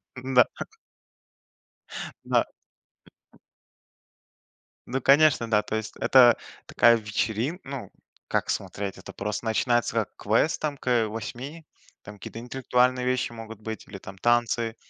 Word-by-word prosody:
Н-да. 130 Hz, -1 st, +4 dB
Ха. -, -, -6 dB, 1.6 s
Да. -, -, +2 dB, 2.4 s
Ну, 130 Hz, +2 st, -2 dB
конечно, 140 Hz, -3 st, +4 dB
да, 105 Hz, -1 st, +4 dB
то 110 Hz, -, -4 dB
есть 110 Hz, 0 st, -4 dB
это 125 Hz, -3 st, +6 dB, 0.3 s
такая 120 Hz, 0 st, +5 dB
вечерин 110 Hz, -, -2 dB
ну, 135 Hz, -1 st, -7 dB, 0.4 s
как -, -, -1 dB
смотреть? 100 Hz, -1 st, -3 dB
Это 95 Hz, -, -11 dB
просто 105 Hz, +2 st, -4 dB
начинается 120 Hz, +1 st, +1 dB
как 110 Hz, -3 st, -1 dB
квест 110 Hz, +10 st, +1 dB
там, 150 Hz, -2 st, -2 dB
к, -, -, -16 dB
э, 120 Hz, -3 st, +3 dB
8. 125 Hz, +9 st, -7 dB, 0.4 s
Там 105 Hz, -, -10 dB
какие-то 105 Hz, +3 st, -9 dB
интеллектуальные 125 Hz, +1 st, +1 dB
вещи 125 Hz, -1 st, 0 dB
могут 115 Hz, -2 st, -9 dB
быть 110 Hz, 0 st, -6 dB
или 100 Hz, -, -8 dB
там 95 Hz, 0 st, -11 dB
танцы, 120 Hz, +1 st, +1 dB
120 Hz, 130 wpm, -26 LUFS, 110-130 Hz, 2.4 s, это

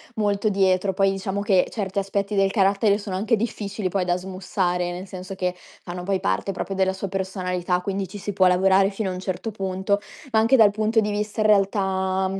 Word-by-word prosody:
molto 205 Hz, 0 st, +1 dB
dietro. 190 Hz, -1 st, +2 dB
Poi, 195 Hz, +1 st, +2 dB
diciamo 195 Hz, +1 st, -3 dB
che 195 Hz, -3 st, +3 dB
certi 200 Hz, -2 st, -2 dB
aspetti 200 Hz, +1 st, -2 dB
del 195 Hz, -1 st, +3 dB
carattere, 200 Hz, +1 st, +3 dB
sono 200 Hz, -3 st, -4 dB
anche 220 Hz, +3 st, +2 dB
difficili 210 Hz, -3 st, -3 dB
poi 185 Hz, 0 st, 0 dB
da 175 Hz, 0 st, +1 dB
smussare, 180 Hz, -1 st, -2 dB
nel 180 Hz, +2 st, -6 dB
senso 185 Hz, 0 st, -8 dB
che 180 Hz, -1 st, -1 dB, 0.3 s
fanno, 180 Hz, 0 st, -6 dB
poi, 195 Hz, +1 st, 0 dB
parte 95 Hz, -, 0 dB
proprio 195 Hz, -, -4 dB
della 190 Hz, 0 st, +1 dB
sua 190 Hz, +1 st, -5 dB
personalità, 180 Hz, -2 st, -2 dB
quindi 195 Hz, 0 st, -3 dB
ci 190 Hz, -, -9 dB
si 205 Hz, +1 st, -4 dB
può 185 Hz, -1 st, +4 dB
lavorare 190 Hz, +2 st, +4 dB
fino 195 Hz, 0 st, -3 dB
a -, -, -3 dB
un 180 Hz, -, -5 dB
certo 190 Hz, +4 st, -4 dB
punto. 195 Hz, 0 st, -1 dB, 0.3 s
Ma 220 Hz, -, +4 dB
anche 225 Hz, +4 st, +4 dB
dal 220 Hz, -5 st, +6 dB
punto 215 Hz, +2 st, +1 dB
di 210 Hz, 0 st, -1 dB
vista, 210 Hz, +1 st, -2 dB
in 215 Hz, -, +3 dB
realtà, 190 Hz, -2 st, +2 dB
mhmm, 195 Hz, +1 st, -4 dB
195 Hz, 215 wpm, -23 LUFS, 185-205 Hz, 0.3 s, dal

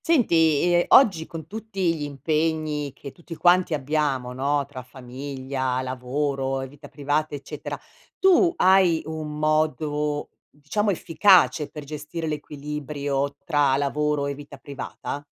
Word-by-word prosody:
Senti, 165 Hz, -, +3 dB
ehm, 175 Hz, 0 st, +3 dB
oggi, 190 Hz, -11 st, +5 dB
con 160 Hz, -2 st, -8 dB
tutti 195 Hz, -2 st, -2 dB
gli 155 Hz, -, -7 dB
impegni, 150 Hz, +1 st, -1 dB
che 140 Hz, -, -10 dB
tutti 170 Hz, +1 st, -10 dB
quanti 175 Hz, -1 st, +3 dB
abbiamo, 140 Hz, -3 st, -1 dB
no, 140 Hz, +2 st, 0 dB
tra 135 Hz, -2 st, -9 dB
famiglia, 130 Hz, +1 st, -4 dB
lavoro 135 Hz, +1 st, -2 dB
e 135 Hz, -, -5 dB
vita 140 Hz, +1 st, -14 dB
privata, 145 Hz, +1 st, -1 dB
eccetera, 140 Hz, -1 st, -7 dB, 0.4 s
tu 375 Hz, -2 st, +5 dB
hai 185 Hz, -, +4 dB
un 155 Hz, -1 st, -5 dB
modo, 150 Hz, -1 st, 0 dB, 0.3 s
diciamo, 205 Hz, +9 st, 0 dB
efficace, 180 Hz, -3 st, +4 dB
per 150 Hz, -, -8 dB
gestire 150 Hz, +3 st, -6 dB
l'equilibrio 145 Hz, -2 st, -3 dB
tra 145 Hz, -4 st, +2 dB
lavoro 150 Hz, +1 st, 0 dB
e 140 Hz, -, -2 dB
vita 145 Hz, 0 st, -11 dB
privata? 140 Hz, +1 st, -7 dB
150 Hz, 130 wpm, -24 LUFS, 140-160 Hz, 0.4 s, oggi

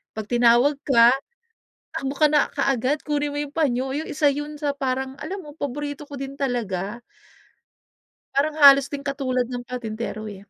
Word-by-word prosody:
'pag 220 Hz, -, -4 dB
tinawag 240 Hz, +4 st, +4 dB
ka, 235 Hz, -2 st, +6 dB, 0.8 s
takbo 270 Hz, 0 st, -2 dB
ka 305 Hz, +1 st, +4 dB
na 295 Hz, -1 st, +2 dB
kaagad, 275 Hz, +1 st, 0 dB
kunin 295 Hz, -1 st, 0 dB
mo 290 Hz, -, -3 dB
yung 290 Hz, -1 st, -5 dB
panyo, 265 Hz, -3 st, 0 dB
yung 315 Hz, -, -3 dB
1 295 Hz, 0 st, +1 dB
yun 295 Hz, +2 st, -4 dB
sa 290 Hz, -, 0 dB
parang 265 Hz, 0 st, -2 dB
alam 375 Hz, +8 st, -6 dB
mo 295 Hz, -2 st, -12 dB
paborito 285 Hz, +1 st, -4 dB
ko 285 Hz, -, -14 dB
din 275 Hz, 0 st, -6 dB
talaga. 230 Hz, -5 st, -2 dB, 1.4 s
Parang 305 Hz, +2 st, +1 dB
halos 275 Hz, -1 st, +8 dB
singkatulad 275 Hz, -3 st, -2 dB
ng 245 Hz, -1 st, -5 dB
patintero 220 Hz, -3 st, -5 dB
eh. 205 Hz, -2 st, -8 dB
275 Hz, 160 wpm, -23 LUFS, 245-290 Hz, 1.4 s, halos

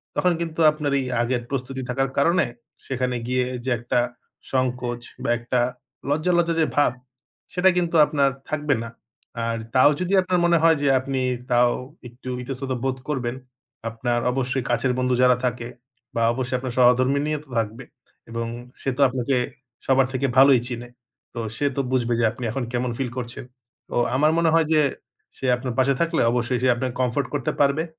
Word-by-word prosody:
তখন 180 Hz, -, +3 dB
কিন্তু 165 Hz, -1 st, -4 dB
আপনার 150 Hz, -2 st, -3 dB
এই 130 Hz, -, -2 dB, 0.2 s
আগের 120 Hz, +1 st, 0 dB
প্রস্তুতি 130 Hz, -1 st, -3 dB
থাকার 135 Hz, +2 st, 0 dB
কারণে 170 Hz, +4 st, +3 dB, 0.4 s
সেখানে 125 Hz, -1 st, -1 dB
গিয়ে 125 Hz, 0 st, +1 dB, 0.2 s
যে 130 Hz, -, -2 dB
একটা 120 Hz, +1 st, 0 dB, 0.5 s
সংকোচ 125 Hz, -2 st, -1 dB, 0.2 s
বা -, -, -1 dB
একটা 120 Hz, +1 st, -1 dB, 0.5 s
লজ্জা, 155 Hz, +5 st, +1 dB
লজ্জা 170 Hz, -1 st, +2 dB
যে -, -, +4 dB
ভাব 145 Hz, -3 st, +4 dB, 0.6 s
সেটা 185 Hz, +1 st, +4 dB
কিন্তু 175 Hz, -1 st, 0 dB
আপনার 140 Hz, -2 st, +2 dB, 0.2 s
থাকবে 150 Hz, -2 st, 0 dB
না। 115 Hz, -, -6 dB, 0.6 s
আর 115 Hz, 0 st, -1 dB, 0.2 s
তাও 130 Hz, +3 st, +7 dB
যদি 180 Hz, +2 st, -1 dB
আপনার 180 Hz, -1 st, 0 dB
মনে 170 Hz, 0 st, +4 dB
হয় 165 Hz, -1 st, +5 dB
যে 145 Hz, -, +1 dB
আপনি 130 Hz, 0 st, -2 dB, 0.3 s
তাও 120 Hz, 0 st, +5 dB, 0.4 s
একটু 125 Hz, +2 st, -10 dB
ইতস্তত 135 Hz, +1 st, -5 dB
বোধ 135 Hz, -1 st, -1 dB
করবেন 125 Hz, -4 st, -2 dB, 0.5 s
আপনার 120 Hz, +1 st, -1 dB
অবশ্যই 130 Hz, 0 st, -1 dB
কাছের 125 Hz, +1 st, +1 dB
বন্ধু 130 Hz, 0 st, +1 dB
যারা 125 Hz, 0 st, +6 dB
থাকে 120 Hz, -1 st, -2 dB, 0.5 s
বা 115 Hz, -, +1 dB
অবশ্যই 125 Hz, +1 st, -2 dB
আপনার 125 Hz, -1 st, -5 dB
সহধর্মিণীও 130 Hz, +4 st, +3 dB
তো -, -, -25 dB
থাকবে 115 Hz, +3 st, -4 dB, 0.5 s
এবং 115 Hz, 0 st, -3 dB, 0.3 s
সে -, -, -1 dB
তো -, -, 0 dB
আপনাকে 130 Hz, +1 st, 0 dB, 0.5 s
সবার 135 Hz, -1 st, +4 dB
থেকে 130 Hz, +1 st, 0 dB
ভালোই 135 Hz, -1 st, +7 dB
চিনে। 120 Hz, -1 st, -6 dB, 0.4 s
তো 120 Hz, -, -5 dB, 0.2 s
সে 145 Hz, -, 0 dB
তো 140 Hz, -, +1 dB
বুঝবে 120 Hz, -2 st, +1 dB
যে 115 Hz, -, +3 dB
আপনি 125 Hz, -, -9 dB
এখন 135 Hz, +2 st, -2 dB
কেমন 125 Hz, 0 st, -1 dB
ফিল 135 Hz, -2 st, -2 dB
করছেন। 120 Hz, 0 st, -5 dB, 0.4 s
তো -, -, -5 dB, 0.2 s
আমার 150 Hz, +3 st, +4 dB
মনে 170 Hz, -1 st, +3 dB
হয় 165 Hz, -1 st, +4 dB
যে 155 Hz, -, +5 dB, 0.6 s
সে -, -, -6 dB
আপনার 125 Hz, 0 st, -4 dB
পাশে 135 Hz, +1 st, +4 dB
থাকলে 170 Hz, -1 st, +1 dB
অবশ্যই 120 Hz, +1 st, 0 dB
সে -, -, +4 dB
আপনাকে 125 Hz, +1 st, -3 dB
কমফোর্ট 130 Hz, +3 st, 0 dB
করতে 140 Hz, -3 st, -1 dB
পারবে 140 Hz, +3 st, +3 dB
130 Hz, 175 wpm, -23 LUFS, 125-145 Hz, 0.6 s, তাও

